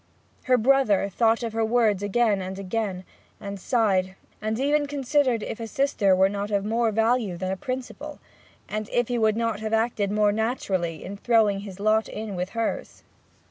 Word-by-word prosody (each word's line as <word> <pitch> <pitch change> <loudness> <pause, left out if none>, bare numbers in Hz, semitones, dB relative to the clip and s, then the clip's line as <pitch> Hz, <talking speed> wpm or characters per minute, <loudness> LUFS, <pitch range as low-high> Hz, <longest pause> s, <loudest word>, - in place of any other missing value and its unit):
Her 255 -1 +4
brother 220 -5 +3
thought 225 +4 +2
of 230 -2 -3
her 225 0 0
words 220 -3 +2
again 205 0 +1
and 190 +1 -5
again, 195 -1 -3 0.4
and 200 -1 -6
sighed, 190 -4 +1 0.3
and 220 +2 -2
even 290 +2 +2
considered 275 -4 +1
if - - -5
a 225 - -5
sister 220 -7 +2
were 190 +1 +4
not 200 +1 -3
of 200 -1 0
more 225 +1 +1
value 225 -3 +1
than 185 +1 -3
a - - -1
principle, 255 +4 -6 0.5
and 215 0 -4
if 240 0 0
he 245 -1 0
would 220 -1 +2
not 230 -3 -1
have 220 0 -4
acted 220 -3 +1
more 210 0 +3
naturally 195 - -2
in 200 +2 -7
throwing 220 -2 +3
in - - -6
his 195 -2 -9
lot 215 +1 +2
with 195 -4 -4
hers. 230 - -3
220 Hz, 180 wpm, -25 LUFS, 200-235 Hz, 0.5 s, Her